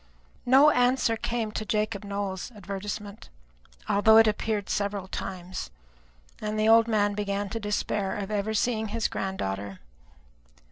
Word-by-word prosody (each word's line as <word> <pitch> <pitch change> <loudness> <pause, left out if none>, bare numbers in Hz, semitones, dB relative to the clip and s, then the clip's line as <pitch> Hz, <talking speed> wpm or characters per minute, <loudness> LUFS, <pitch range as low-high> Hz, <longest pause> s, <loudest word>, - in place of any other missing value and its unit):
No 275 +4 +7
answer 245 -2 +2
came 225 -1 -2
to 215 - -3
Jacob 215 -2 -1
Nowell's 200 +1 -4
advertisement, 205 +1 -6 0.6
although 220 +2 +5
it 225 - +8
appeared 210 -1 -1
several 200 -2 -2
times; 185 - -6 0.7
and 215 0 -2
the 215 - +2
old 225 0 +6
man 205 -2 +2
began 200 -1 -2
to 225 - -4
despair 205 -1 -2
of 205 0 -5
ever 210 +1 -1
seeing 220 0 0
his 225 +1 -1
granddaughter. 100 - -4
210 Hz, 135 wpm, -27 LUFS, 200-220 Hz, 0.7 s, it